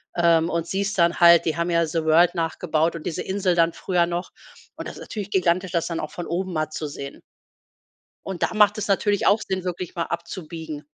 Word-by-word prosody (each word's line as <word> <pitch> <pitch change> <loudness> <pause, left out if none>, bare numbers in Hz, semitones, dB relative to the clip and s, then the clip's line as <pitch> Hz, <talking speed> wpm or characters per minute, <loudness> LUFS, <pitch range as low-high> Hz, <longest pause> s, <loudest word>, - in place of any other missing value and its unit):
ähm, 170 -1 +3
und 170 -1 -1
siehst 200 +3 -2
dann 170 -1 +2
halt, 170 -1 +7
die 160 - -1
haben 170 +1 -1
ja 170 -1 +2
„The 160 0 -2
World“ 165 +2 +5
nachgebaut 165 -1 -1
und 165 - -8
diese 165 - -3
Insel 190 -2 0
dann 165 -1 +3
früher 180 -2 +1
noch. 175 +1 -4 0.5
Und - - -6
das - - -8
ist - - -11
natürlich 205 -2 -6
gigantisch, 185 -1 +1
das 170 -1 0
dann 165 -1 -3
auch 155 - -5
von 175 - -6
oben 185 +1 -3
mal 155 -1 -1
zu 155 0 -5
sehen. 140 -1 -8 1.1
Und 190 -2 -4
da - - 0
macht 210 0 +4
es 210 -1 -3
natürlich 205 +1 +1
auch 205 +3 +4
Sinn, 190 -1 -2
wirklich 180 -1 -5
mal 170 - -1
abzubiegen. 165 -3 -6
170 Hz, 220 wpm, -23 LUFS, 165-185 Hz, 1.1 s, halt